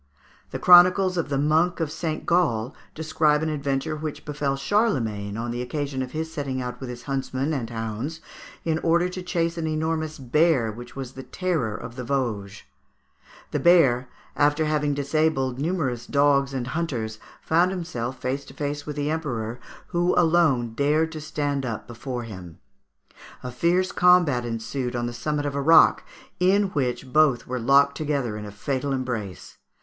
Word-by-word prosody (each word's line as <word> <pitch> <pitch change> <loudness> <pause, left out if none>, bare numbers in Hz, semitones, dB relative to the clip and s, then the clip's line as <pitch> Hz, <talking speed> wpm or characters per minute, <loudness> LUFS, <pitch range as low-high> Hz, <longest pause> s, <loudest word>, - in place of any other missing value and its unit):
The - - -4
Chronicles 180 +1 +6
of 165 -4 -1
the 140 - 0
Monk 160 +6 +2
of 160 -3 -1
Saint 155 -1 -4
Gall 140 -9 +1 0.2
describe 155 -1 +1
an 160 - 0
adventure 140 +1 -2
which 155 -1 -6
befell 145 -2 -1
Charlemagne 120 - 0
on 120 +1 -3
the 120 +1 -3
occasion 140 +1 -3
of 130 - -4
his 160 +2 -4
setting 140 -4 -3
out 125 -1 -5
with 130 - -6
his 120 0 -8
huntsmen 135 +1 -2
and 120 -6 -3
hounds 115 +7 -4 0.5
in 160 -1 +1
order 170 +2 +2
to 185 0 -6
chase 170 -1 -1
an 160 - -2
enormous 155 0 -2
bear 135 -2 +2
which 120 +3 -11
was 135 -2 -6
the 135 - -9
terror 150 - -2
of 115 +3 -8
the 125 - -4
Vosges. 110 -7 -2 0.9
The - - 0
bear, 135 -8 +4 0.3
after 150 +2 +2
having 150 -2 0
disabled 140 -3 0
numerous 140 -7 -2
dogs 140 -1 +3
and 130 -3 -3
hunters, 125 -8 -3 0.2
found 170 +3 +3
himself 130 -9 -4
face 135 +2 -2
to 135 - -14
face 145 0 -4
with 150 - -4
the 145 0 -1
Emperor, 120 -7 -3 0.3
who 175 0 +1
alone 160 -9 +3
dared 150 +5 +1
to 155 -1 -7
stand 145 -2 -2
up 115 -4 -4
before 120 +1 -6
him. 95 -7 -9 0.9
A 125 - -5
fierce 175 +8 +1
combat 175 -9 +4
ensued 120 +2 -3
on 120 0 -1
the 120 - -4
summit 145 +4 -2
of 145 - -2
a 140 - -1
rock, 165 +4 +6 0.4
in 195 +2 +3
which 130 -3 -2
both 150 -5 +4
were 125 0 -3
locked 140 +4 +4
together 140 -7 -2
in 105 0 -6
a 105 - -8
fatal 135 +6 -2
embrace. 120 -8 -5
140 Hz, 170 wpm, -24 LUFS, 125-160 Hz, 0.9 s, Chronicles